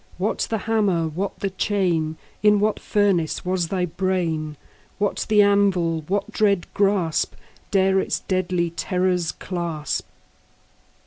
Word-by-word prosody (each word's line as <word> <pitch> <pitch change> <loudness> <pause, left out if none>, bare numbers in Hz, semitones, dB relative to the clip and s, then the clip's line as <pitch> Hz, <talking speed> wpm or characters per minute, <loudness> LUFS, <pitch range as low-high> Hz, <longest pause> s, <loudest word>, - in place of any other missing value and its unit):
What 195 +5 -1
the 225 - 0
hammer? 205 -6 +1
what 185 +6 -4
the 195 - -1
chain? 175 -6 0 0.2
In 210 -1 +5
what 215 +1 +1
furnace 195 -7 +1
was 180 -2 0
thy 180 0 0
brain? 165 -4 -2 0.4
What 205 -1 -1
the 210 -1 +6
anvil? 190 -5 +2
What 200 +1 -1
dread 200 -5 +2
grasp 195 -5 +1
15 - - -26 0.2
Dare 190 -1 +3
its - - -1
deadly 180 -2 0
terrors 180 -1 0
clasp? 170 -5 -4
185 Hz, 130 wpm, -23 LUFS, 170-200 Hz, 0.4 s, the